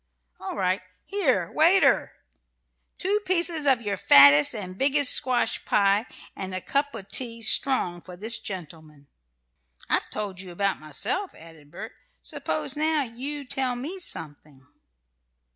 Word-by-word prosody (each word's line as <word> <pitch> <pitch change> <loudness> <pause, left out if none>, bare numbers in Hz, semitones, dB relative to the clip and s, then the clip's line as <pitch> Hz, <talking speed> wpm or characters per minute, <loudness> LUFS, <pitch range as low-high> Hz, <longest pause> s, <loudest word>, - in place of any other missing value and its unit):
"All - - -6
right! 185 0 -1 0.2
Here, 260 - 0
waiter! 345 +5 +3 0.8
Two 400 +3 0
pieces 340 -5 0
of 255 -3 +3
your 200 -2 -3
fattest 145 +3 +7
and 185 -4 -7
biggest 275 +3 +3
squash 250 -1 +1
pie; 200 +3 +1 0.3
and 190 -1 -6
a - - -3
cup 280 +6 -2
of 195 -3 -9
tea, 230 -3 +1
strong, 200 -7 +2
for 180 0 -12
this 220 +4 -2
gentleman." 155 -5 -9 0.8
"I've - - 0
told 200 -3 -5
you 190 - -10
about 195 +2 -2
myself," 375 - -2
added 160 -3 -16
Bert; - - -9 0.3
"suppose, 155 - -4
now, 310 0 0
you 275 +4 -6
tell 255 -1 -2
me 305 +10 -6
something." 145 - -5
215 Hz, 135 wpm, -25 LUFS, 175-285 Hz, 0.8 s, fattest